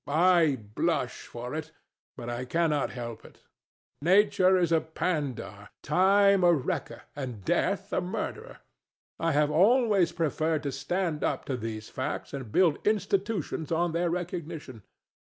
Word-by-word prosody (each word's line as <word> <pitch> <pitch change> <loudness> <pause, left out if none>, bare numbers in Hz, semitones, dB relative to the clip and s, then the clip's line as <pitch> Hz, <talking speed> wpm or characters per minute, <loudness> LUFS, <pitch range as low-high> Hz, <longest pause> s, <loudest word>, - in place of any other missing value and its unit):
I 165 -2 +4 0.2
blush 150 -3 -1
for 120 +2 -7
it; 155 +1 -5 0.5
but 120 -2 -7
I 120 +1 -3
cannot 150 +1 0
help 115 -3 -7
it. - - -17 0.6
Nature 185 +2 +4
is 175 -2 +1
a 165 -1 +4
pandar, 145 - -3
Time 195 +4 +4
a 175 - +6
wrecker, 145 -7 -2
and 125 -9 -6
Death - - 0
a - - +1
murderer. - - -5 0.6
I 165 0 +1
have 150 0 +2
always 205 - +4
preferred 160 -1 -1
to 140 - -2
stand 165 +3 -2
up - - -1
to 135 - -2
those 110 -2 -6
facts - - -4
and 130 -6 -6
build 165 - +3
institutions 200 -6 -1
on 170 +1 +1
their 170 +1 0
recognition. 165 -8 -5
160 Hz, 140 wpm, -28 LUFS, 135-180 Hz, 0.6 s, a